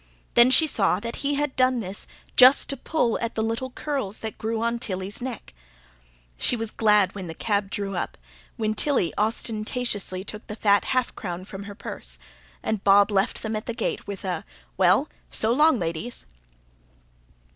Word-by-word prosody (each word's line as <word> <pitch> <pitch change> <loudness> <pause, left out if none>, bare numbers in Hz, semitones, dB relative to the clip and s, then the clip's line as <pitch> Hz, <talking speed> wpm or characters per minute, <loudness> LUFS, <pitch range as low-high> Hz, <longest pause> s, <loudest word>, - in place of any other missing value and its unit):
Then 240 +1 +7
she 265 +5 +7
saw 195 -10 +1
that 230 +2 -5
he 285 0 0
had 290 -1 -1
done 255 -1 +3
this 195 -2 -4 0.3
just 260 +3 +7
to - - -1
pull 255 -3 0
at 230 -1 -3
the 220 - 0
little 230 +4 -2
curls 260 -7 -3
that 220 -1 -6
grew 220 0 -2
on 235 0 0
Tilly's 190 0 -3
neck. 250 - -6 0.9
She - - +2
was 225 -2 -4
glad 210 -3 +3
when 190 -3 -6
the 165 - -7
cab 205 0 -1
drew 195 -1 -3
up, 175 - -3 0.4
when 215 -2 0
Tilly 215 - +1
ostentatiously 215 -2 -1
took 210 +2 -8
the 210 - -6
fat 205 -2 +3
half 255 -2 0
crown 180 -2 -5
from 195 0 -8
her 200 0 -8
purse, - - -6 0.5
and 215 -3 -2
Bob 200 +1 +5
left 195 -1 0
them 220 0 -2
at 215 - -5
the 235 - -3
gate 235 - -3
with 200 -1 -6
a: 185 -1 -2 0.3
"Well, - - +4 0.2
so 220 - +1
long, 300 +1 +5
ladies!" 170 +6 -4
220 Hz, 180 wpm, -25 LUFS, 200-245 Hz, 0.9 s, Then